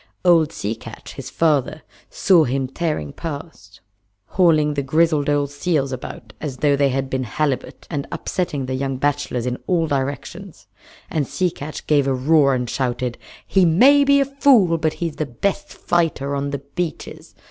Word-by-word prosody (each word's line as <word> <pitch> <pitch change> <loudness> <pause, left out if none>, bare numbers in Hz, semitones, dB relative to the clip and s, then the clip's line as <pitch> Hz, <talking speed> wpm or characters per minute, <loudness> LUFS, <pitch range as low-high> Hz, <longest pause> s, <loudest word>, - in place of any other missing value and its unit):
Old 165 -3 +5
Sea 105 -6 -3
Catch, - - -11
his - - -8
father, 155 -1 0 0.3
saw 180 -5 +4
him 135 +1 -1
tearing 135 - -3
past, 145 - -8 0.5
hauling 155 -5 +3
the 145 - -1
grizzled 155 +1 +2
old 145 -1 +1
seals 145 -2 -1
about 125 -3 -8
as 140 -4 -4
though 145 +1 +3
they 140 0 +2
had 135 +1 -1
been 130 0 -2
halibut, 135 +2 -3
and 145 -4 -4
upsetting 150 -7 -3
the 130 - -4
young 135 0 -2
bachelors 145 -3 -1
in 125 0 -2
all 170 -3 +2
directions; 145 +6 -4 0.5
and 150 -4 -1
Sea 180 -2 0
Catch 150 +1 -8
gave 145 -2 +2
a 135 - +1
roar 140 +1 +3
and 125 -1 -2
shouted: 125 -1 -2 0.3
"He 190 - +3
may 255 - +6
be 280 0 +4
a 275 - +3
fool, 255 -11 +3
but 155 -1 0
he 170 - -3
is 150 - -15
the 155 - -1
best 200 - -2
fighter 155 -5 -1
on 140 0 -2
the 140 -1 -5
beaches! 175 -3 -5
145 Hz, 175 wpm, -21 LUFS, 135-165 Hz, 0.5 s, may